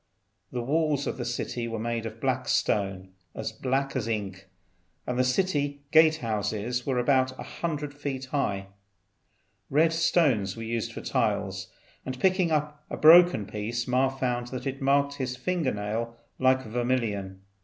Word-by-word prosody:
The 125 Hz, -1 st, -3 dB
walls 150 Hz, +1 st, +1 dB
of -, -, -3 dB
the 120 Hz, -, -4 dB
city 120 Hz, 0 st, -3 dB
were 115 Hz, -1 st, -4 dB
made 115 Hz, 0 st, -2 dB
of 110 Hz, 0 st, -9 dB
black -, -, -1 dB
stone, 95 Hz, -2 st, 0 dB, 0.3 s
as 110 Hz, 0 st, -3 dB
black 135 Hz, +5 st, -1 dB
as 120 Hz, -4 st, -1 dB
ink, 100 Hz, -4 st, -4 dB, 0.6 s
and 125 Hz, -, -2 dB
the -, -, +5 dB
city 145 Hz, 0 st, 0 dB
gate 160 Hz, 0 st, +6 dB
houses 110 Hz, 0 st, -2 dB
were 130 Hz, -2 st, +1 dB
about 130 Hz, +1 st, +2 dB
100 150 Hz, -4 st, -4 dB
feet 140 Hz, -2 st, -4 dB
high. 100 Hz, -9 st, -2 dB, 1.0 s
Red 160 Hz, +4 st, +3 dB
stones 145 Hz, -, +2 dB
were 115 Hz, -, -5 dB
used 115 Hz, 0 st, -2 dB
for -, -, -7 dB
tiles, -, -, -1 dB, 0.4 s
and 130 Hz, 0 st, -5 dB
picking 185 Hz, -2 st, +3 dB
up 150 Hz, -1 st, -1 dB
a -, -, -4 dB
broken 170 Hz, -, +7 dB
piece 110 Hz, +4 st, -3 dB
Ma 130 Hz, +1 st, +3 dB
found 125 Hz, -2 st, -2 dB
that 130 Hz, +1 st, -6 dB
it 135 Hz, +1 st, -4 dB
marked 140 Hz, +1 st, +2 dB
his 125 Hz, -2 st, -2 dB
finger 160 Hz, +1 st, 0 dB
nail 110 Hz, +3 st, -3 dB, 0.2 s
like 130 Hz, 0 st, +3 dB
vermilion. 110 Hz, -5 st, -2 dB
125 Hz, 155 wpm, -27 LUFS, 115-145 Hz, 1.0 s, broken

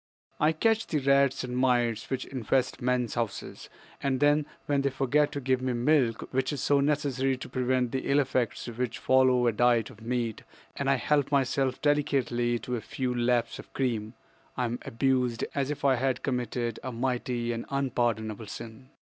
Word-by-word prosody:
"I 150 Hz, +1 st, +4 dB
catch 225 Hz, +7 st, +1 dB
the 155 Hz, -, 0 dB
rats 140 Hz, -1 st, +3 dB
and 125 Hz, -1 st, -4 dB
mice 120 Hz, -3 st, +1 dB
which 130 Hz, -, -2 dB
infest 130 Hz, 0 st, -1 dB
men's 125 Hz, -2 st, 0 dB
houses, 115 Hz, -3 st, -4 dB, 0.3 s
and 135 Hz, -2 st, 0 dB
then 145 Hz, +1 st, +3 dB, 0.2 s
when 145 Hz, -1 st, +1 dB
they 140 Hz, -, +1 dB
forget 145 Hz, +2 st, +1 dB
to 145 Hz, -, -2 dB
give 130 Hz, -1 st, 0 dB
me 130 Hz, -1 st, -1 dB
milk 120 Hz, -2 st, +2 dB
which 130 Hz, 0 st, +1 dB
is 145 Hz, -, -3 dB
so 145 Hz, -1 st, +3 dB
necessary 135 Hz, -2 st, +1 dB
to -, -, -8 dB
prevent 125 Hz, -1 st, 0 dB
the 130 Hz, -, -3 dB
ill 140 Hz, -, +4 dB
effects 130 Hz, -4 st, -1 dB
which 120 Hz, 0 st, -3 dB
follow 130 Hz, -1 st, +4 dB
a 120 Hz, -, +4 dB
diet 120 Hz, 0 st, +2 dB
of 110 Hz, -, -16 dB
meat 115 Hz, -1 st, -2 dB, 0.3 s
and 140 Hz, -1 st, -1 dB
I 135 Hz, -, +5 dB
help 145 Hz, +2 st, +1 dB
myself 135 Hz, -1 st, +1 dB
delicately 125 Hz, -5 st, +1 dB
to 125 Hz, +1 st, -4 dB
a 115 Hz, -, -4 dB
few 125 Hz, +3 st, -3 dB
laps 120 Hz, -1 st, 0 dB
of -, -, -11 dB
cream, 115 Hz, -4 st, -2 dB, 0.4 s
I 125 Hz, -, +1 dB
am 120 Hz, +1 st, -3 dB
abused 125 Hz, -1 st, 0 dB
as 140 Hz, -1 st, -1 dB
if 145 Hz, -1 st, -3 dB
I 135 Hz, -2 st, +4 dB
had 130 Hz, +1 st, -1 dB
committed 120 Hz, -3 st, -2 dB
a 130 Hz, -, -5 dB
mighty 120 Hz, -1 st, -1 dB
and 115 Hz, 0 st, -4 dB
unpardonable 115 Hz, -5 st, -1 dB
sin. 115 Hz, +5 st, -9 dB
130 Hz, 180 wpm, -28 LUFS, 120-135 Hz, 0.4 s, I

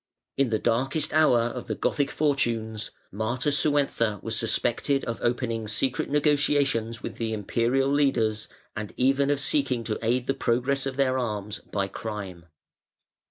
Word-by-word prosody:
In 135 Hz, -2 st, +2 dB
the 110 Hz, -, +1 dB
darkest 130 Hz, +7 st, 0 dB
hour 155 Hz, -7 st, +5 dB
of 120 Hz, +1 st, -3 dB
the -, -, -2 dB
Gothic 140 Hz, -1 st, 0 dB
fortunes 115 Hz, -8 st, 0 dB, 0.2 s
(540) 120 Hz, +7 st, -1 dB
Matasuentha 140 Hz, -7 st, +1 dB
was 115 Hz, 0 st, -2 dB
suspected 120 Hz, +4 st, 0 dB
of 115 Hz, -1 st, -3 dB
opening 115 Hz, -2 st, -1 dB
secret 125 Hz, +5 st, -1 dB
negotiations 145 Hz, -6 st, +1 dB
with -, -, -6 dB
the 115 Hz, -1 st, -2 dB
Imperial 120 Hz, +6 st, +1 dB
leaders, 120 Hz, -7 st, +1 dB, 0.3 s
and 105 Hz, -1 st, -6 dB
even 135 Hz, +2 st, +3 dB
of 145 Hz, -1 st, +2 dB
seeking 135 Hz, -3 st, +1 dB
to 110 Hz, -1 st, -3 dB
aid 120 Hz, +2 st, +1 dB
the 135 Hz, -, +1 dB
progress 130 Hz, +4 st, 0 dB
of 135 Hz, -, -4 dB
their 130 Hz, -1 st, +2 dB
arms 105 Hz, -4 st, -3 dB
by 100 Hz, -1 st, -3 dB
crime. 100 Hz, -6 st, -6 dB
120 Hz, 150 wpm, -26 LUFS, 110-140 Hz, 0.3 s, hour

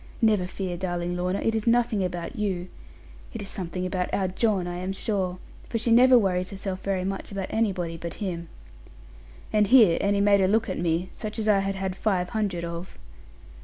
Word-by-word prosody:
Never 210 Hz, -6 st, +3 dB
fear, 185 Hz, -1 st, -4 dB
darling 175 Hz, -1 st, -2 dB
Lorna, 180 Hz, +2 st, -1 dB
it 225 Hz, -, +1 dB
is 220 Hz, 0 st, -2 dB
nothing 230 Hz, -4 st, +3 dB
about 175 Hz, -2 st, -4 dB
you. 185 Hz, -4 st, -2 dB, 0.7 s
It 225 Hz, -, -4 dB
is 195 Hz, -, -8 dB
something 180 Hz, -1 st, -4 dB
about 180 Hz, -1 st, -2 dB
our 190 Hz, -1 st, +1 dB
John, 190 Hz, 0 st, +1 dB
I 175 Hz, 0 st, -4 dB
am 185 Hz, +2 st, -3 dB
sure; 190 Hz, -3 st, -2 dB, 0.3 s
for 230 Hz, -, -1 dB
she 230 Hz, +1 st, 0 dB
never 250 Hz, +2 st, +7 dB
worries 185 Hz, -4 st, +1 dB
herself 190 Hz, -1 st, -5 dB
very 190 Hz, -2 st, -1 dB
much 195 Hz, +1 st, -4 dB
about 195 Hz, -2 st, -4 dB
anybody 185 Hz, -7 st, -1 dB
but 170 Hz, 0 st, -6 dB
him.' 170 Hz, -4 st, -4 dB, 1.0 s
And 210 Hz, -1 st, +4 dB
here 220 Hz, -9 st, +6 dB
Annie 200 Hz, 0 st, +2 dB
made 200 Hz, -1 st, +4 dB
a 190 Hz, -, +4 dB
look 220 Hz, +3 st, +2 dB
at -, -, -3 dB
me, 170 Hz, +2 st, 0 dB
such 215 Hz, 0 st, -6 dB
as 220 Hz, -1 st, -1 dB
I 205 Hz, -2 st, +5 dB
had 195 Hz, 0 st, -1 dB
had 190 Hz, -1 st, -3 dB
five 185 Hz, -4 st, 0 dB
hundred 195 Hz, -6 st, -2 dB
of. 170 Hz, +2 st, -7 dB
190 Hz, 200 wpm, -26 LUFS, 180-210 Hz, 1.0 s, never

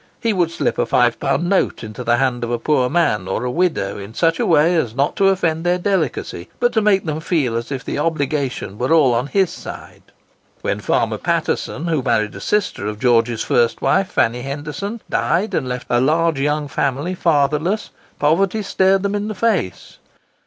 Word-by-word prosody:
He 230 Hz, -2 st, 0 dB
would 175 Hz, -4 st, +1 dB
slip 170 Hz, -, -2 dB
a -, -, +2 dB
five 120 Hz, -2 st, +2 dB
pound 170 Hz, +5 st, 0 dB
note 195 Hz, -8 st, +1 dB
into 110 Hz, +3 st, -7 dB
the 120 Hz, 0 st, +2 dB
hand 125 Hz, -2 st, 0 dB
of 120 Hz, -, -2 dB
a 120 Hz, -, 0 dB
poor 125 Hz, 0 st, +1 dB
man 115 Hz, -, +1 dB
or 95 Hz, +5 st, -2 dB
a 125 Hz, -, -1 dB
widow 160 Hz, -, 0 dB
in 100 Hz, +3 st, -9 dB
such 165 Hz, -1 st, +1 dB
a -, -, +1 dB
way 165 Hz, +1 st, +4 dB
as 120 Hz, -9 st, -1 dB
not 140 Hz, +2 st, 0 dB
to 195 Hz, -, +4 dB
offend 165 Hz, -4 st, 0 dB
their 175 Hz, 0 st, +2 dB
delicacy, 175 Hz, -, -2 dB
but 240 Hz, 0 st, +2 dB
to 220 Hz, -, +2 dB
make 200 Hz, -3 st, +2 dB
them 155 Hz, -1 st, -2 dB
feel 155 Hz, -8 st, 0 dB
as 115 Hz, +3 st, -4 dB
if 135 Hz, -2 st, -4 dB
the -, -, -3 dB
obligation 140 Hz, -9 st, -2 dB
were 125 Hz, +5 st, -1 dB
all 150 Hz, -7 st, +5 dB
on 120 Hz, +3 st, 0 dB
his 190 Hz, +3 st, +1 dB
side. -, -, -10 dB, 0.6 s
When -, -, -1 dB
Farmer -, -, 0 dB
Paterson, 155 Hz, -, -1 dB
who 160 Hz, -4 st, 0 dB
married 110 Hz, -4 st, 0 dB
a -, -, -9 dB
sister 205 Hz, -, -1 dB
of 105 Hz, 0 st, -4 dB
George's 120 Hz, -1 st, +2 dB
first 120 Hz, -1 st, +1 dB
wife, 190 Hz, -, +2 dB
Fanny 120 Hz, +2 st, +1 dB
Henderson, 150 Hz, -, -5 dB
died 190 Hz, +6 st, 0 dB
and 130 Hz, -5 st, -1 dB
left 125 Hz, 0 st, -4 dB
a 120 Hz, 0 st, +2 dB
large 160 Hz, +1 st, +2 dB
young 150 Hz, +1 st, 0 dB
family 140 Hz, +5 st, -1 dB
fatherless, 160 Hz, +4 st, +1 dB, 0.3 s
poverty 190 Hz, +8 st, +1 dB
stared 190 Hz, 0 st, +2 dB
them 200 Hz, 0 st, -1 dB
in 205 Hz, 0 st, -2 dB
the 215 Hz, -, -4 dB
face. 205 Hz, -, -1 dB
150 Hz, 200 wpm, -19 LUFS, 125-180 Hz, 0.6 s, all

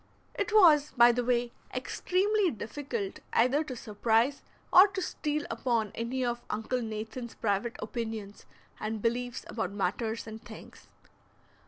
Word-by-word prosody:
It 405 Hz, +2 st, -2 dB
was, 315 Hz, -9 st, +6 dB
by 240 Hz, 0 st, +8 dB
the 245 Hz, +1 st, -1 dB
way, 240 Hz, -1 st, +1 dB, 0.2 s
extremely 395 Hz, +1 st, +1 dB
difficult 235 Hz, -4 st, -5 dB
either 260 Hz, +6 st, +3 dB
to 260 Hz, -4 st, -6 dB
surprise 225 Hz, +5 st, +1 dB, 0.3 s
or 370 Hz, +3 st, +10 dB
to 385 Hz, -1 st, -5 dB
steal 300 Hz, -4 st, -2 dB
upon 230 Hz, -5 st, 0 dB
any 250 Hz, +3 st, -2 dB
of 240 Hz, 0 st, -2 dB
Uncle 225 Hz, +4 st, -2 dB
Nathan's 225 Hz, +2 st, -5 dB
private 215 Hz, +2 st, -1 dB
opinions 220 Hz, -2 st, -5 dB, 0.3 s
and 215 Hz, 0 st, -3 dB
beliefs 245 Hz, +2 st, -2 dB
about 200 Hz, -4 st, -3 dB
matters 220 Hz, +3 st, -2 dB
and 220 Hz, 0 st, -9 dB
things. 235 Hz, -2 st, -12 dB
235 Hz, 135 wpm, -30 LUFS, 220-280 Hz, 0.3 s, or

